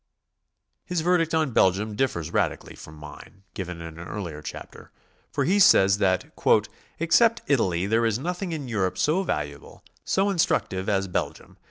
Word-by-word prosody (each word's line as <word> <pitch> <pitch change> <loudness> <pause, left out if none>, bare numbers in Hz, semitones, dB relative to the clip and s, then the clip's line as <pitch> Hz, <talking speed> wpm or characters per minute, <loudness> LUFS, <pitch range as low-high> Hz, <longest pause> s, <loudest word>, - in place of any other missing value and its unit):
His 180 -2 -2
verdict 165 -1 +1
on 155 -4 +1
Belgium 105 +1 +2
differs 85 -11 -2
radically - - -1
from 75 - -12
mine, 75 +5 -13
given 90 -3 -6
in 80 0 -9
an 85 - -8
earlier 85 -8 -6
chapter, - - -10 0.4
for - - -1
he 195 +5 +2
says 100 - +5
that 95 -2 0 0.6
"except 225 +8 +3
Italy 95 -10 +1
there 115 +3 +2
is 110 -1 0
nothing 180 +6 -4
in 150 -5 -5
Europe 100 -6 -1
so 160 +6 +1
valuable, 75 - -5 0.2
so 195 +1 +1
instructive 95 - 0
as 95 -1 0
Belgium. 90 - -4
105 Hz, 155 wpm, -25 LUFS, -, 0.6 s, says